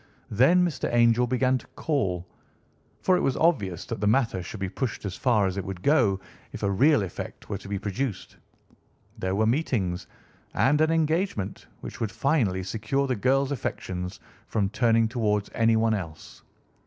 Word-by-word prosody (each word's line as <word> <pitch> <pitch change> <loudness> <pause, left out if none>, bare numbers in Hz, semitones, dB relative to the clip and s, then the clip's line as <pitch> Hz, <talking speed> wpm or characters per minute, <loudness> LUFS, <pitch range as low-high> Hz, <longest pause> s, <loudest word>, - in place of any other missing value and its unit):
Then 155 - +5
Mr. 170 -5 -2
Angel 120 +1 +4
began 130 +1 +2
to - - -17
call, 95 - -1 0.8
for 185 - +4
it - - 0
was 135 - 0
obvious 100 - +1
that 115 - -5
the 105 - +1
matter 115 -4 +2
should 95 +4 -8
be 95 - -2
pushed 110 +3 -4
as 95 -1 -4
far 115 -6 +2
as 95 0 -2
it 100 - -2
would 95 -1 -7
go 120 -10 +3 0.3
if - - -7
a 100 - +2
real 140 +5 +4
effect 95 - -7
were 100 - -1
to 100 - -11
be 100 0 -2
produced. 105 +3 -4 0.8
There 95 +1 -1
were 110 +2 +2
meetings, 110 - 0 0.5
and 145 +3 +3
an 155 - +4
engagement, 160 - -1
which - - -8
would 110 -3 -2
finally 105 -7 +1
secure 110 +8 -1
the 130 -2 0
girl's 135 +5 +1
affections 90 -8 -4 0.3
from 100 -3 0
turning 115 +1 +3
towards 105 -3 -1
anyone 115 0 +3
else. 85 -7 -6
110 Hz, 170 wpm, -26 LUFS, 100-135 Hz, 0.8 s, Then